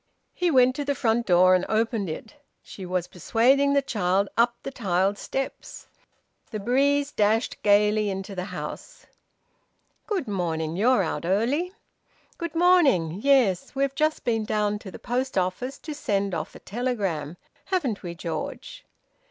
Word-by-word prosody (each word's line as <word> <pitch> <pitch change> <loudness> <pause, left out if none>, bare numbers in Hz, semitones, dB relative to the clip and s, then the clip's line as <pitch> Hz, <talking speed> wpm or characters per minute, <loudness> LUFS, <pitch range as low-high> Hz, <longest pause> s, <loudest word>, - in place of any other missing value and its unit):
He 360 - 0
went 255 -3 +4
to 290 - -1
the 285 0 -1
front 235 -1 0
door 185 0 +6
and 185 0 +3
opened 220 -3 0
it. 185 +7 -7 0.3
She 190 -2 -9
was 180 -1 -1
persuading 265 - +2
the 280 0 +3
child 200 -5 0
up 235 +1 +3
the 275 - -5
tiled 195 -4 0
steps. 270 0 -5 0.6
The 215 - -4
breeze 280 +6 +2
dashed 220 +1 +1
gaily 210 0 +3
into 195 +1 -5
the 180 -1 -4
house. - - -8 1.0
"Good 390 - -2
morning. 165 -5 -2
You're 220 +2 +3
out 160 - -3
early." 235 - 0 0.7
"Good 335 -2 -5
morning. 290 - +4
Yes. 260 -8 +3
We've 275 0 0
just 310 +2 0
been 225 -3 0
down 210 -1 0
to 205 - -9
the - - -9
post 255 +1 -2
office 185 +9 -1
to 310 - -7
send 200 -9 -1
off 160 - -4
a - - -10
telegram, 195 - -3 0.3
haven't 285 - -1
we, 175 -2 -6
George?" 175 - -6
220 Hz, 150 wpm, -25 LUFS, 190-270 Hz, 1.0 s, door